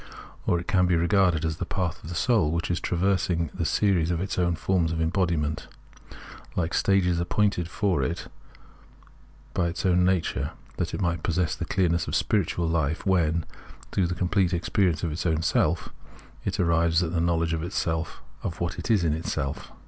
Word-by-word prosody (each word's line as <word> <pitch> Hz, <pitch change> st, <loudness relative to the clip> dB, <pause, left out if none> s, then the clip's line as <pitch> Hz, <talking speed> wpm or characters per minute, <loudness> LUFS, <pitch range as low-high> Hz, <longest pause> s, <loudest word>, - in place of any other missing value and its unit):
Or 85 Hz, -, +3 dB
it 85 Hz, -, -8 dB
can 90 Hz, -1 st, +3 dB
be 90 Hz, -, +3 dB
regarded 85 Hz, -2 st, +3 dB
as 80 Hz, -1 st, -2 dB
the -, -, -3 dB
path 90 Hz, -4 st, -2 dB
of 80 Hz, -, -8 dB
the 85 Hz, -, -5 dB
soul, 110 Hz, -4 st, +2 dB
which 85 Hz, +2 st, -1 dB
is 85 Hz, -, 0 dB
traversing 90 Hz, -3 st, 0 dB
the 85 Hz, -, -2 dB
series 90 Hz, -3 st, +2 dB
of 85 Hz, -1 st, 0 dB
its 95 Hz, +1 st, -2 dB
own 85 Hz, -1 st, +2 dB
forms 85 Hz, -1 st, +1 dB
of 80 Hz, -, -2 dB
embodiment, 80 Hz, -3 st, 0 dB, 0.9 s
hke 85 Hz, -1 st, -1 dB
stages 90 Hz, -3 st, +2 dB
appointed 90 Hz, 0 st, +1 dB
for 95 Hz, 0 st, 0 dB
it 85 Hz, -, -2 dB, 1.3 s
by 85 Hz, -, +1 dB
its 85 Hz, +3 st, -4 dB
own 90 Hz, -1 st, +4 dB
nature, 90 Hz, -2 st, 0 dB, 0.2 s
that -, -, -2 dB
it -, -, -4 dB
may 85 Hz, -1 st, +1 dB
possess 85 Hz, +1 st, 0 dB
the -, -, -4 dB
clearness 85 Hz, -4 st, +1 dB
of -, -, -2 dB
spiritual 85 Hz, -4 st, +1 dB
hfe 80 Hz, -2 st, 0 dB
when, 85 Hz, -4 st, +2 dB, 0.5 s
through 95 Hz, -3 st, +1 dB
the 90 Hz, -, -2 dB
com 90 Hz, +1 st, -1 dB
plete 95 Hz, -3 st, +2 dB
experience 90 Hz, -1 st, +1 dB
of 85 Hz, -, 0 dB
its 85 Hz, +4 st, -2 dB
own 80 Hz, -1 st, +1 dB
self, 80 Hz, -, +1 dB, 0.6 s
it -, -, -2 dB
arrives 85 Hz, 0 st, +3 dB
at 85 Hz, 0 st, -3 dB
the 85 Hz, -, +1 dB
know 85 Hz, 0 st, +2 dB
ledge 80 Hz, 0 st, 0 dB
of 80 Hz, 0 st, -3 dB
what 85 Hz, -1 st, -2 dB
it -, -, -5 dB
is 105 Hz, -6 st, +4 dB
in 80 Hz, -3 st, +2 dB
itself. 75 Hz, -3 st, -3 dB
85 Hz, 185 wpm, -26 LUFS, 80-90 Hz, 1.3 s, own